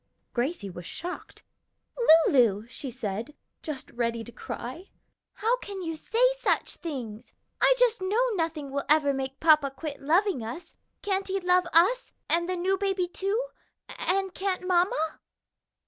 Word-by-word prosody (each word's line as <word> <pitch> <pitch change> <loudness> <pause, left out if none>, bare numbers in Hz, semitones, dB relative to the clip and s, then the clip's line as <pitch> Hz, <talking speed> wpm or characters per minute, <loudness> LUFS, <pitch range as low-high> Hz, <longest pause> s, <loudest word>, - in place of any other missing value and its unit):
Gracie 245 - -1
was 175 -1 -8
shocked, 355 +2 -6 0.8
"Lulu!" 225 -6 +3
she 270 +2 -7
said, 230 +3 -5 0.3
just 300 -5 -6
ready 235 -1 -1
to 240 - -10
cry, 260 +10 -7 0.4
"how 460 +4 +1
can 395 -5 -7
you 325 -1 -3
say 455 +10 0 0.2
such - - 0
things? 245 -10 -6 0.3
I - - +6
just 475 -4 +3
know 435 +7 +2
nothing 325 -6 -2
will 280 0 -1
ever 295 -2 +4
make 270 0 -4
papa 305 -3 +5
quit 285 +2 -7
loving 335 - +2
us. 315 +10 -7 0.3
Can't 390 -1 -1
he 390 0 -1
love 360 -1 +3
us 400 +10 +3
and 340 +1 +1
the 370 - 0
new 375 +2 0
baby 385 -3 0
too? 395 +7 -1 0.5
and 385 0 0
can't 375 -1 -2
mamma?" 350 -3 +1
335 Hz, 145 wpm, -27 LUFS, 270-385 Hz, 0.8 s, I